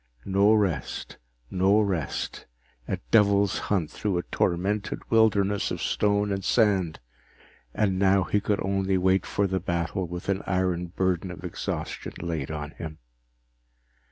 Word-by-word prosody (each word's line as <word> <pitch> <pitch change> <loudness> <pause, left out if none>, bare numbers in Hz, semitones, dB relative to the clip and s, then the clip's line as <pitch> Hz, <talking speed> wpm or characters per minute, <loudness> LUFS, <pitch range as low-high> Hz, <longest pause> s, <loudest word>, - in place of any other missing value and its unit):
No 100 +2 +4
rest, 95 - -1 0.3
no 95 +3 +4
rest, 95 -9 -2 0.4
a - - -1
devil's 100 -2 +4
hunt 90 -7 0
through 100 -4 -1
a 85 - -1
tormented 100 +4 -1
wilderness 105 -3 +3
of - - -3
stone 105 0 +1
and 95 -1 -2
sand, 95 -9 +2 0.7
and 95 - 0
now 95 0 +4
he 105 +3 0
could 105 -1 0
only 95 0 +1
wait 95 0 +2
for 100 - +1
the 95 -1 0
battle 85 +1 -2
with 90 +1 -7
an 100 0 0
iron 90 -2 0
burden 95 0 -1
of 90 - -9
exhaustion - - -4
laid 80 -5 -3
on 75 -1 -5
him. 80 -2 -8
95 Hz, 140 wpm, -26 LUFS, 90-100 Hz, 0.7 s, No